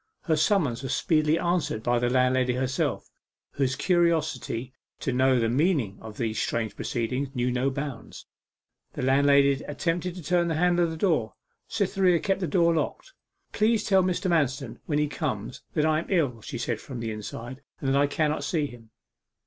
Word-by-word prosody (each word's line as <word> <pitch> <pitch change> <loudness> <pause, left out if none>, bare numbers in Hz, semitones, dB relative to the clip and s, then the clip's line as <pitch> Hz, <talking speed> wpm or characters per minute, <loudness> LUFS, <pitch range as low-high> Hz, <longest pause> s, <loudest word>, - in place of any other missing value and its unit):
Her 160 - +2
summons 155 - +1
was 135 -1 -2
speedily 155 -2 +2
answered 170 -11 -1
by 120 0 +2
the 120 0 +1
landlady 125 0 +2
herself, 130 +1 -2 0.4
whose 130 -2 0
curiosity 160 -9 0 0.3
to 130 - -2
know 130 +1 +3
the 115 - +1
meaning 130 - +1
of 110 -1 -10
these 110 -2 -1
strange 110 -2 -2
proceedings 125 +4 -2
knew 125 0 0
no 125 +2 +1
bounds. 135 -3 -6 0.7
The - - -4
landlady 140 +1 +4
attempted 170 +4 -2
to 180 - -8
turn 175 +1 +2
the 165 - -1
handle 175 +1 +3
of - - -2
the 160 - -5
door. 155 - +1 0.3
Cytherea 180 -3 +2
kept 195 +2 0
the 180 - -1
door 170 -2 +3
locked. 335 - -3 0.4
'Please 220 +1 +2
tell 190 -2 +4
Mr. 185 +1 0
Manston 135 -7 0
when 145 - 0
he 150 - +2
comes 135 - -4
that 155 -2 +2
I 155 0 +3
am 165 - -6
ill,' 140 - +1
she - - -6
said 120 -2 -2
from 130 -4 -7
the 115 -1 -3
inside, 115 +5 -7 0.2
'and 135 - -2
that 135 - +2
I 145 - +3
cannot 150 0 0
see 150 +1 0
him. 120 -5 -11
140 Hz, 180 wpm, -26 LUFS, 125-170 Hz, 0.7 s, landlady